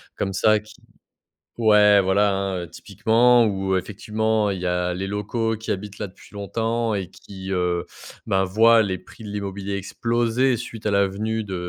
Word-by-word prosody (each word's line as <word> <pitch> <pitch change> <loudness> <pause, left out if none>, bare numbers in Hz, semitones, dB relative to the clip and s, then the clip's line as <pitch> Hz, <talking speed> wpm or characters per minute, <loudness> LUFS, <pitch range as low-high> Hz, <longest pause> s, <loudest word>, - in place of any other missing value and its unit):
comme 95 -1 -2
ça 110 +2 +3
qui 105 +1 -16 0.8
ouais, 105 -3 +5
voilà, 100 +2 +2
hein, 95 -1 -2
heu, - - -9
typiquement 120 +8 +3
où 95 -2 0
effectivement, 110 +2 -1
il 95 -2 -3
y 90 - -3
a 90 0 0
les 95 +2 -3
locaux 110 +3 -2
qui 110 - -7
habitent 100 +1 -4
là 105 - -4
depuis 95 - -18
longtemps 115 +3 -1
et 95 -3 -3
qui, 95 -1 -10
heu, 90 -2 0 0.4
ben, 95 -3 +2
voient 110 +4 +5
les 95 -3 -2
prix 115 - -16
de - - -7
l'immobilier 100 -1 -4
exploser 120 +5 0
suite 115 -2 -8
à - - +2
la 100 0 +3
venue 110 +3 -3
de, 95 -2 -6
105 Hz, 180 wpm, -23 LUFS, 95-110 Hz, 0.8 s, ouais